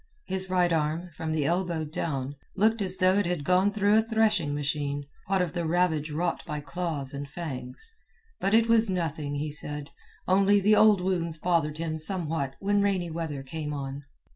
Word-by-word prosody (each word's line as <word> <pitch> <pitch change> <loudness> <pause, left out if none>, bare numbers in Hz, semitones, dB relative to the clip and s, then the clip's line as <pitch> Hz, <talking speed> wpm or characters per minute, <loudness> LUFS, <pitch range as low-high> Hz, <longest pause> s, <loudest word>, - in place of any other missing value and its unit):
His 190 0 -2
right 180 -2 +2
arm, 160 +3 -1
from 160 +1 -4
the 155 -2 0
elbow 170 -1 0
down, 145 -3 -3 0.2
looked 220 +2 +3
as 190 -1 +3
though 185 +2 +4
it 205 - 0
had 175 -4 -1
gone 185 +4 +3
through 205 +1 +3
a - - +4
threshing 220 -8 +2
machine, 145 -1 -2 0.2
what 190 -1 +2
of 170 - -4
the 175 - -2
ravage 160 -3 +1
wrought 170 +4 -1
by 150 -2 -4
claws 150 -4 -4
and 140 0 -5
fangs. 150 - -5 0.5
But 200 +3 +2
it 225 0 +4
was 230 -2 +4
nothing, 160 -5 -2
he 150 +1 -2
said, 145 0 -4 0.4
only 200 +2 +5
the 210 +2 +4
old 210 -3 +6
wounds 170 -3 -1
bothered 160 -3 0
him 160 -1 -3
somewhat 160 -5 -1
when 200 +1 +2
rainy 190 -4 0
weather 160 -4 -4
came 150 +1 -5
on. 140 0 -5
170 Hz, 185 wpm, -27 LUFS, 150-190 Hz, 0.5 s, old